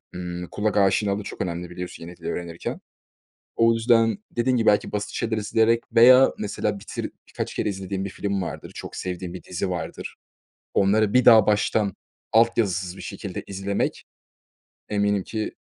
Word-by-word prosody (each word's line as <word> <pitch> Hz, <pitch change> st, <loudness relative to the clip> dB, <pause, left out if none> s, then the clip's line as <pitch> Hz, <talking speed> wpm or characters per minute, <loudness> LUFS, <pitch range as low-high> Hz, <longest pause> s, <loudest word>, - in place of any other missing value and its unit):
ımm, 90 Hz, 0 st, -5 dB
kulak 105 Hz, 0 st, -1 dB
aşinalığı 100 Hz, +1 st, +2 dB
çok -, -, -7 dB
önemli, 85 Hz, -1 st, -3 dB
biliyorsun, 90 Hz, -1 st, -7 dB
yeni 85 Hz, +1 st, -10 dB
dili -, -, -8 dB
öğrenirken. 85 Hz, -1 st, -5 dB, 0.8 s
O 115 Hz, 0 st, +5 dB
yüzden 115 Hz, -, +3 dB
dediğin 125 Hz, +2 st, +1 dB
gibi 115 Hz, -, 0 dB
belki 105 Hz, -, +3 dB
basit 105 Hz, 0 st, -2 dB
şeyler 110 Hz, -1 st, -1 dB
izleyerek 110 Hz, +2 st, +2 dB
veya 130 Hz, +3 st, +7 dB
mesela 105 Hz, 0 st, -2 dB
bitir -, -, -5 dB, 0.2 s
birkaç -, -, -5 dB
kere -, -, -1 dB
izlediğin 95 Hz, 0 st, -3 dB
bir 100 Hz, -, -4 dB
film 100 Hz, -2 st, -2 dB
vardır, -, -, -6 dB
çok -, -, -8 dB
sevdiğin 90 Hz, -1 st, -5 dB
bir 90 Hz, -, -8 dB
dizi 90 Hz, +1 st, -3 dB
vardır. 85 Hz, -3 st, -5 dB, 0.6 s
Onları 100 Hz, +1 st, +3 dB
bir 125 Hz, 0 st, +4 dB
daha 110 Hz, -4 st, +8 dB
baştan 105 Hz, -1 st, +2 dB, 0.4 s
alt 115 Hz, +1 st, +4 dB
yazısız 95 Hz, -4 st, -1 dB
bir -, -, -8 dB
şekilde 90 Hz, +1 st, -6 dB
izlemek 100 Hz, +1 st, -2 dB, 0.9 s
eminim 100 Hz, -1 st, +1 dB
ki 110 Hz, +3 st, -4 dB
100 Hz, 160 wpm, -24 LUFS, 90-110 Hz, 0.9 s, daha